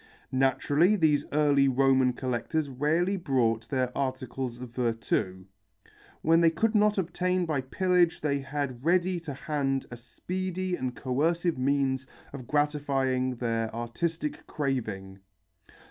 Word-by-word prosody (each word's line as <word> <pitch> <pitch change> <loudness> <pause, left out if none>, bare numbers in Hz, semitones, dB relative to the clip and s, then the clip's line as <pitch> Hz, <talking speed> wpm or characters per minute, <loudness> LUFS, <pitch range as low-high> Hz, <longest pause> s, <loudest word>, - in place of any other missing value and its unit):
Naturally, 145 +8 +3
these 150 -6 +2
early 145 -2 +3
Roman 130 -1 +3
collectors 130 +4 -2
rarely 160 +9 +1
bought 120 - 0
their 130 -2 -1
articles 130 -2 -3
of 125 -2 -8
virtu. 115 -6 -1 0.8
When 165 +1 +4
they 165 - +6
could 220 +7 0
not 210 -1 +3
obtain 180 0 0
by 155 -5 -1
pillage 175 +5 +2
they 140 -2 0
had 135 -3 -4
ready 180 +2 +2
to 155 -5 -7
hand 135 -2 -1
a 120 - -7
speedy 185 +9 -4
and 125 -5 -4
coercive 165 +5 0
means 135 -1 0 0.3
of 130 -4 -8
gratifying 135 -4 0
their 115 -2 -1
artistic 150 +7 -3
craving. 110 -10 -3
140 Hz, 125 wpm, -28 LUFS, 125-165 Hz, 0.8 s, they